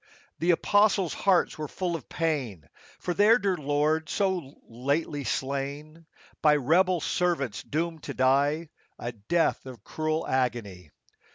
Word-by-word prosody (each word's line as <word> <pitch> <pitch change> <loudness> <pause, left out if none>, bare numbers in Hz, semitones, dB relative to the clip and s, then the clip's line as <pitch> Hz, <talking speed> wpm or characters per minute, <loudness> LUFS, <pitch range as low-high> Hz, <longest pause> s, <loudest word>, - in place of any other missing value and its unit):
47 - - -27
The 170 +2 +3
apostles' 205 0 +3
hearts 185 -5 +1
were 150 - -3
full 175 +2 -3
of 155 - -8
pain 130 - -2 0.3
For 180 - -3
their 210 +5 +5
dear 200 -5 0
Lord 150 +1 0
so 185 -8 -1
lately 140 +5 -2
slain, 140 +5 -4 0.3
By 150 -1 +5
rebel 170 +5 +2
servants 165 - -1
doomed 165 +1 -3
to - - -5
die 140 +5 +2 0.3
A 120 - -4
death 120 +10 0
of 120 -6 -10
cruel 155 0 -2
agony. 115 - -2
155 Hz, 140 wpm, -27 LUFS, 135-170 Hz, 0.3 s, their